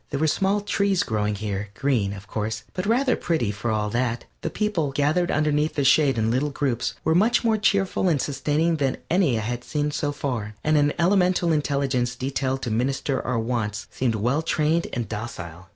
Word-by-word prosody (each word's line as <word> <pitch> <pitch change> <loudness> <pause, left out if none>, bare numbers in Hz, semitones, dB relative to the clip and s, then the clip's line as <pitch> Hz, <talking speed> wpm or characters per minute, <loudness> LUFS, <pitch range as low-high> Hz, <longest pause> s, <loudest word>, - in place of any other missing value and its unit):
There 140 - -2
were 160 - +2
small 195 +6 +1
trees 200 -2 +1
growing 105 -2 -1
here, 100 0 -4
green, 120 -8 +1
of 100 0 -9
course, 110 0 -3
but 185 +1 -3
rather 255 +3 +3
pretty 155 -11 0
for 105 +3 -4
all 105 -1 0
that; 120 0 -1 0.2
the - - -2
people, 200 -9 -1
gathered 150 +6 +1
under 150 0 +1
their 150 -1 0
shade 135 -2 +4
in 110 0 +1
little 135 +5 +1
groups, 125 -5 -1
were 160 - +2
much 220 +9 +3
more 225 -1 +3
cheerful 195 -2 +2
and 155 -5 +2
sustaining 150 +4 0
than 135 -3 0
any 170 -9 +3
I - - -1
had 120 +2 -3
seen 150 +1 -1
so 145 0 -1
far, 120 -7 -4
and 155 0 +2
an 145 0 +3
elemental 180 -1 +3
intelligence 140 -5 0
detailed 130 +1 -2
to 120 - -2
minister 130 +4 0
to - - -10
our 125 -2 0
wants 110 -3 -2
seemed 120 -3 0
well 125 +8 +1
trained 160 +1 +1
and 120 -3 -3
docile. 95 -5 -7
140 Hz, 200 wpm, -24 LUFS, 115-160 Hz, 0.2 s, shade